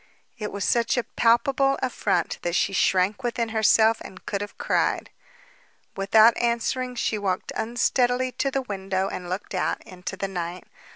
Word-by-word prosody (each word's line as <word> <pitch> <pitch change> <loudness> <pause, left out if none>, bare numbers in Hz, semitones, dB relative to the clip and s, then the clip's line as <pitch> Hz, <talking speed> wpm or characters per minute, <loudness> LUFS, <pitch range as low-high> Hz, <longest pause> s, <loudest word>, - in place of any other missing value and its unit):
It 210 -1 -4
was 200 0 -3
such 235 +1 +2
a 245 - +1
palpable 270 +5 +2
affront 240 -8 -1
that 175 0 -2
she 195 - +1
shrank 190 +3 +2
within 235 -2 -1
herself 220 0 +4
and 185 - -11
could 200 -1 -2
have 205 - -7
cried. - - 0 0.8
Without 215 +4 +5
answering, 240 +2 -1
she 220 -2 -1
walked 190 -2 -2
unsteadily 245 +2 +1
to 275 - -1
the 270 0 -2
window 195 -3 -2
and 180 -1 -6
looked 190 +3 -5
out 185 - -1
into 185 +1 -8
the 195 - -2
night. 180 -1 -5
220 Hz, 160 wpm, -25 LUFS, 190-240 Hz, 0.8 s, Without